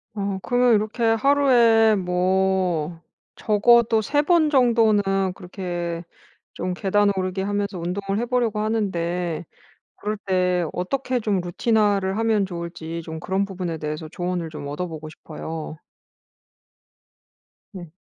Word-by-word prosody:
어 200 -1 -2
그러면 245 +1 +3
이렇게 215 +3 0
하루에 230 -2 +4
뭐 180 -3 0 0.4
적어도 225 +1 +4
3 290 +7 +1
번 325 -2 +3
정도는 230 -6 +4 0.3
그렇게 175 -2 -5 0.5
좀 180 +1 -3
계단 200 +2 +2
오르기 185 0 -2
하면서 200 0 -2
운동을 195 +4 -2
해 240 - -1
보려고 235 -3 0
하는데 175 -6 -1 0.5
그럴 210 +1 -3
때 180 -2 +1
어떻게 255 +7 -2
좀 210 -4 0
루틴화를 200 +1 +1
하면 225 -3 +2
좋을지 170 -2 -6
좀 160 0 -7
그런 190 +4 -1
부분에 180 -4 -4
대해서 155 +1 -5
조언을 175 -2 -3
좀 150 -2 -7
얻어 150 +5 -4
보고 155 -1 -8
싶어요. 155 0 -7 2.0
네. 175 -5 -9
190 Hz, 255 characters per minute, -23 LUFS, 175-220 Hz, 2.0 s, 하루에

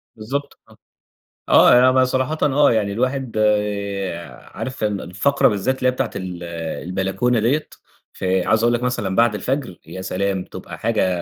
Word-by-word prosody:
بالضبط، 140 +6 -5
آه. - - -19 0.7
آه - - +7
يع - - +7
أنا 130 +1 +5
ب 130 0 +4
صراحةً 130 +4 -1
آه 145 +1 +4
يعني 105 -3 0
الواحد 130 +2 -2
آآ 100 -5 -1
عارف 130 -3 -5
ال 105 -2 -1
الفقرة 100 +11 +2
بالذات 105 +5 0
اللي 130 - 0
هي - - +4
بتاعة 125 -2 -2
ال 90 -3 -6 0.4
البلكونة 95 +7 0
ديّة، 135 +8 +1 0.5
فعايز 95 +4 +1
أقول 120 0 +3
لك 120 +1 -1
مثلًا 105 -7 -1
بعد 115 -1 +3
الفجر 130 -5 -3
يا 90 +3 -7
سلام! 95 0 -2
تبقى - - -9
حاجة 90 -2 0
110 Hz, 165 wpm, -21 LUFS, 95-130 Hz, 0.7 s, آه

